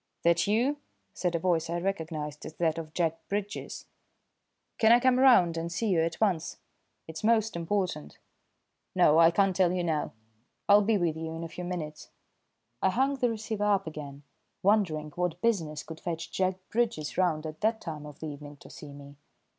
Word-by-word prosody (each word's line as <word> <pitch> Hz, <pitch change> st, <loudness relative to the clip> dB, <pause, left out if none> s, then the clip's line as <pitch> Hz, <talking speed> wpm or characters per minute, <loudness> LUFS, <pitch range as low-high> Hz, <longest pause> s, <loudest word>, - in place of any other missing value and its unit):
"That 170 Hz, +1 st, +3 dB
you?" 245 Hz, +8 st, +2 dB, 0.4 s
said 175 Hz, -2 st, -1 dB
a -, -, +1 dB
voice 165 Hz, -2 st, 0 dB
I 170 Hz, +1 st, -1 dB
recognised 160 Hz, -5 st, -4 dB
as 155 Hz, -, -10 dB
that 165 Hz, -1 st, 0 dB
of 155 Hz, -1 st, -8 dB
Jack 165 Hz, -2 st, 0 dB
Bridges. 205 Hz, 0 st, -4 dB, 0.9 s
"Can 220 Hz, 0 st, +5 dB
I 240 Hz, -, +7 dB
come 255 Hz, 0 st, +3 dB
round 190 Hz, -11 st, +5 dB
and 165 Hz, +1 st, -3 dB
see 220 Hz, +5 st, -1 dB
you 180 Hz, -4 st, +3 dB
at 165 Hz, +1 st, -2 dB
once? 185 Hz, -7 st, 0 dB, 0.5 s
It's 160 Hz, +2 st, -8 dB
most 220 Hz, -2 st, +2 dB
important. 170 Hz, -, -2 dB, 0.8 s
No, 155 Hz, +2 st, +5 dB
I 165 Hz, 0 st, +8 dB
can't 195 Hz, +1 st, +2 dB
tell 185 Hz, -2 st, +3 dB
you 180 Hz, -1 st, -1 dB
now. 160 Hz, -3 st, -1 dB, 0.5 s
I'll 205 Hz, 0 st, +7 dB
be 210 Hz, +1 st, +2 dB
with 170 Hz, -4 st, 0 dB
you 160 Hz, 0 st, -5 dB
in 165 Hz, -, -5 dB
a -, -, -4 dB
few 180 Hz, +2 st, -7 dB
minutes." 170 Hz, -4 st, -5 dB, 0.7 s
I 190 Hz, -, +3 dB
hung 270 Hz, +7 st, +1 dB
the 245 Hz, -2 st, +1 dB
receiver 220 Hz, -2 st, -3 dB
up 200 Hz, -2 st, +2 dB
again, 145 Hz, -3 st, -8 dB, 0.4 s
wondering 180 Hz, -7 st, +2 dB
what 175 Hz, 0 st, -2 dB
business 165 Hz, -9 st, 0 dB
could 160 Hz, -1 st, -9 dB
fetch 165 Hz, -2 st, -5 dB
Jack 185 Hz, 0 st, 0 dB, 0.2 s
Bridges 220 Hz, -10 st, -1 dB
round 165 Hz, -4 st, +1 dB
at 155 Hz, 0 st, -7 dB
that 220 Hz, +1 st, +1 dB
time 150 Hz, -3 st, -7 dB
of 150 Hz, -, -13 dB
the -, -, -4 dB
evening 145 Hz, 0 st, -9 dB
to -, -, -13 dB
see 145 Hz, -2 st, -10 dB
me. 140 Hz, 0 st, -12 dB
170 Hz, 185 wpm, -29 LUFS, 160-205 Hz, 0.9 s, I